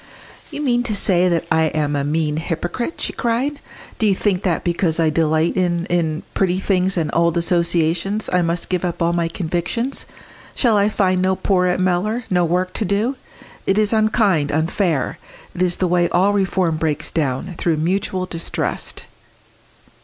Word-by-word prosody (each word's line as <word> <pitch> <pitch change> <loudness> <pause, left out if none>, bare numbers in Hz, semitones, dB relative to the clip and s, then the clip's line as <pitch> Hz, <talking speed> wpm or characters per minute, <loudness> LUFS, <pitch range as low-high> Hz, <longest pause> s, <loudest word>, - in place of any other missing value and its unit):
"You 300 - -5
mean 240 -3 +2
to 215 - 0
say 180 -2 +3
that 170 -2 0
I 160 0 +4
am 150 -1 0
a 140 - 0
mean 150 +1 0
hypocrite!" 175 - -3
she - - -3
cried. 255 +5 -1 0.4
"Do 220 - +3
you 195 - +3
think 195 -2 0
that 175 -5 0
because 170 -2 0
I 160 -1 +3
delight 160 +1 +1
in 175 -2 0
in 160 -2 0
pretty 185 -2 +1
things 190 -1 0
and 160 -3 0
old 170 0 +2
associations, 170 +3 +1
I 180 - +4
must 170 0 -1
give 180 -2 -1
up 175 -1 -2
all 170 +1 +2
my 170 -1 0
convictions? 175 +9 -2 0.5
Shall 235 -4 +3
I 205 0 +3
find 185 -3 +1
no 190 0 +2
poor 185 -1 +1
at 180 0 0
Mellor 185 +6 0
no 180 -1 +3
work 180 +2 0
to - - +3
do? 210 +7 0 0.5
It 195 - +2
is 215 0 +3
unkind 215 -8 +2
unfair. 160 -1 0 0.3
It 175 - -5
is 180 -1 +2
the 185 - 0
way 175 0 +2
all 190 +3 +3
reform 190 -4 +1
breaks 155 -2 -2
down 155 +4 -2
through 165 -3 +1
mutual 185 +3 -1
distrust!" 165 -2 -4
180 Hz, 175 wpm, -20 LUFS, 165-195 Hz, 0.5 s, I